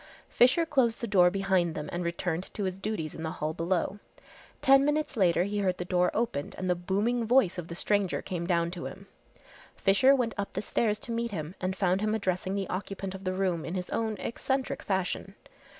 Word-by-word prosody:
Fisher 255 +8 +4
closed 260 -7 +2
the 235 - -2
door 185 -5 +5
behind 190 -3 +1
them 150 0 -4
and 175 +1 -2
returned 170 +1 -2
to 205 - -2
his 185 0 -3
duties 195 -7 -3
in - - -8
the 160 0 -3
hall 155 +1 -2
below. 175 +4 -1 0.6
Ten 275 0 +6
minutes 295 0 0
later 180 -5 +3
he 205 +2 -2
heard 185 -2 +1
the 180 - -4
door 180 0 +2
opened 215 -11 -2
and 185 - -3
the 180 - +4
booming 205 +7 0
voice 225 -8 +3
of 170 - -6
the 170 - -7
stranger 200 0 +1
came 175 -3 -4
down 170 -1 +1
to 175 -1 -6
him. - - -10 0.7
Fisher 260 +8 +5
went 245 -4 0
up 200 - -3
the - - -2
stairs 210 0 +1
to 235 - -5
meet 235 0 -1
him 165 -5 -5
and 185 +1 -1
found 190 0 +1
him 215 0 +1
addressing 190 -2 -1
the 195 -2 -2
occupant 195 0 -4
of 195 0 -9
the 185 - 0
room 185 -4 0
in 170 - -4
his 180 -1 -4
own 220 -2 -1
eccentric 265 +5 -2
fashion. 190 0 -2
190 Hz, 215 wpm, -29 LUFS, 180-220 Hz, 0.7 s, Ten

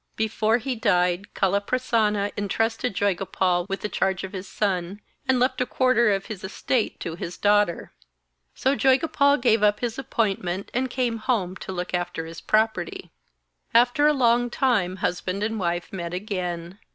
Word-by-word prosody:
Before 220 +1 +1
he 255 +2 -3
died 180 -4 +1
Kaliprasanna 210 +1 +1
entrusted 225 +2 -1
Joygopal 185 -2 0
with 195 - -3
the - - -1
charge 190 -2 -1
of 190 - -6
his 190 0 -6
son, 195 -1 -2 0.3
and 260 -1 +3
left 255 +1 +1
a - - +2
quarter 245 -3 +3
of 195 0 -1
his 215 -5 -7
estate 215 +4 -1
to 165 - -4
his 170 +1 -6
daughter. 205 -4 +2 0.6
So 270 +1 +1
Joygopal 280 +1 +3
gave 230 -3 +3
up 210 0 +3
his 240 0 -2
appointment, 195 -7 -2
and 255 +1 0
came 245 -2 -1
home 215 -6 -1
to - - -7
look 180 -1 -4
after 175 -2 -2
his 165 0 -9
property. 215 -5 0 0.6
After 245 +5 +5
a 300 - +4
long 245 -2 +3
time 220 -9 +1
husband 185 +2 -2
and 220 0 -1
wife 175 0 -2
met 175 -2 -4
again. 180 -2 -4
205 Hz, 160 wpm, -24 LUFS, 185-240 Hz, 0.6 s, After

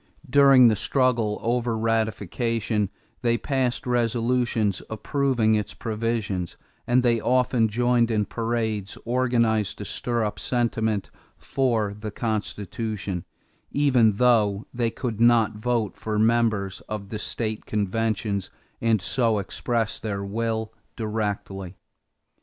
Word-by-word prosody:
During 135 -2 +7
the 110 - +4
struggle 115 -2 +1
over 120 -1 0
ratification, 110 -1 0 0.3
they 120 -1 +2
passed 130 -2 -1
resolutions 120 -3 +1
approving 120 0 +1
its 105 -2 -1
provisions 110 -5 -2 0.3
and 125 +1 +3
they 120 -2 +3
often 125 -2 +2
joined 120 +1 +2
in 105 -2 +1
parades 110 -3 -2
organized 115 -4 +1
to 105 - -6
stir 120 +2 -1
up 105 - -4
sentiment 110 -4 -1 0.3
for 115 -6 0
the 105 +1 -6
Constitution, 105 -3 -3 0.4
even 130 -7 +3
though 105 -2 +3
they 120 -2 0
could 115 -1 -4
not 115 -2 +4
vote 115 -1 -1
for 110 -1 -3
members 110 -3 +1
of 105 -2 -5
the 105 - -4
state 110 -2 -3
conventions 105 -1 -1 0.3
and 110 -4 +2
so 115 -3 +2
express 115 +3 -2
their 100 -2 -3
will 110 +2 -2 0.2
directly. 105 -4 -3
115 Hz, 115 wpm, -25 LUFS, 105-120 Hz, 0.4 s, During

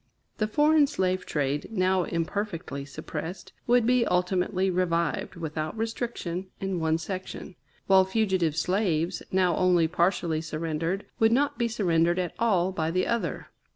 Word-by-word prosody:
The 215 - +1
foreign 295 +4 +4
slave 185 -9 -1
trade, 145 -1 -1
now 185 -3 +2
imperfectly 165 -4 -3
suppressed, 160 +5 -7
would 240 -1 +4
be 250 0 +4
ultimately 185 +1 +1
revived, 170 -3 0
without 155 +2 -4
restriction, 220 -5 -3
in 195 -2 -2
one 160 0 +1
section; 185 +2 -6 0.3
while 190 -1 +6
fugitive 190 -5 +1
slaves, 180 -1 0
now 185 -3 +2
only 175 -3 +3
partially 170 -2 +1
surrendered, 165 +3 -3
would 225 0 +4
not 285 +3 +1
be 235 - +2
surrendered 175 -6 +1
at 180 -2 -2
all 190 -6 +2
by 160 -4 -1
the 185 +2 +1
other. 235 -1 -2
185 Hz, 140 wpm, -27 LUFS, 165-210 Hz, 0.3 s, while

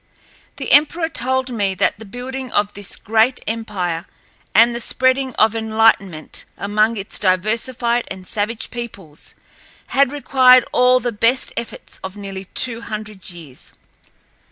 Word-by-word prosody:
The - - -4
emperor 320 +3 +4
told 260 -2 0
me 200 -5 -1
that 205 - 0
the 220 - -9
building 255 +3 -6
of 205 0 0
this 200 -1 -5
great 225 +4 +2
empire 195 -7 -3 0.5
and 230 +3 +6
the 235 - -2
spreading 260 +1 +1
of 220 0 +3
enlightenment 220 -7 +1
among 215 +3 +1
its 200 0 -4
diversified 230 +5 0
and 185 -1 -8
savage 215 +3 -1
peoples 200 -11 -6 0.6
had 275 -1 +4
required 255 -4 +5
all 250 0 +4
the 240 -1 -2
best 230 +4 +1
efforts 235 0 -7
of 190 +1 -7
nearly 195 -1 -7
two 230 +4 0
hundred 215 -3 -7
years. 165 -7 -11
225 Hz, 135 wpm, -19 LUFS, 200-250 Hz, 0.6 s, and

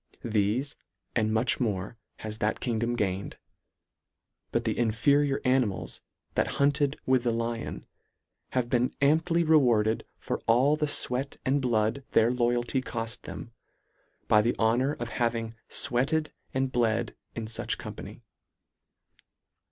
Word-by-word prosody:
Thefe, 115 +6 0 0.4
and 110 -2 +2
much 110 +3 +2
more 105 -3 -2 0.2
has 110 0 -6
that 110 - 0
kingdom 120 0 -1
gained; 100 -4 -2 1.1
but 120 0 0
the 110 - 0
inferior 135 +5 +2
animals 125 -6 0 0.3
that - - 0
hunted 140 0 +2
with 130 -1 +3
the 120 - +2
Lion, 115 0 -3 0.7
have 125 -2 +1
been 125 0 +1
amply 165 +4 +3
rewarded 120 -9 +3
for - - -4
all 130 +6 +4
the 150 0 0
fweat 135 -1 -1
and 140 +2 +2
blood 115 +1 +1
their 115 +2 +5
loyalty 120 +1 +1
coft 115 -1 -4
them, 115 - -7 0.8
by 105 - +6
the 115 +3 0
honour 120 +5 +2
of 120 -5 -5
having 115 -2 -1 0.2
fweated 140 +4 +1 0.2
and 130 0 0
bled 115 -2 0 0.2
in 115 - -3
fuch 110 +1 -1
company. - - -9
120 Hz, 130 wpm, -28 LUFS, 115-135 Hz, 1.1 s, by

